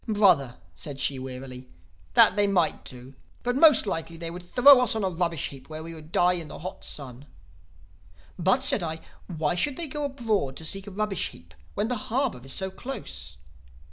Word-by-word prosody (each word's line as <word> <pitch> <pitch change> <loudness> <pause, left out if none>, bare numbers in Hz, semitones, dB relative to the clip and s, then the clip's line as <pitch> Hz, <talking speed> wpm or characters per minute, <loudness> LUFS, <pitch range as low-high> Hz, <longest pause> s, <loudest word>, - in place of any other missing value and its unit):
"'Brother,' 190 - +3 0.2
said 140 - -7
she 135 -1 +1
wearily, 130 0 -8 0.5
'that - - +7
they 205 +1 +2
might 180 -5 +1
do. 125 +1 -11 0.3
But 245 0 0
most 300 -4 +7
likely 165 -3 -4
they 165 0 -5
would 175 +1 -7
throw 250 +9 +7
us 245 -1 +1
on 220 - -1
a 190 - +1
rubbish 170 -3 -1
heap, 135 0 -12
where 155 0 -6
we 165 +1 -7
would 155 0 -12
die 180 0 +3
in 170 -3 -3
the - - -9
hot 185 +4 -8
sun.' 135 -1 -8 1.1
"'But,' 190 +9 +2
said 255 - +4
I, 160 -1 -4 0.3
'why 160 -3 -1
should 260 +10 0
they 340 - -2
go 295 0 -4
abroad 225 - -1
to 160 - -6
seek 195 +4 -1
a - - -5
rubbish 200 -1 -2
heap, 85 -1 -16 0.2
when 205 +2 0
the 240 -3 -4
harbor 250 - 0
is 135 - -9
so 190 +5 -2
close? 260 +8 -7
175 Hz, 200 wpm, -26 LUFS, 150-220 Hz, 1.1 s, that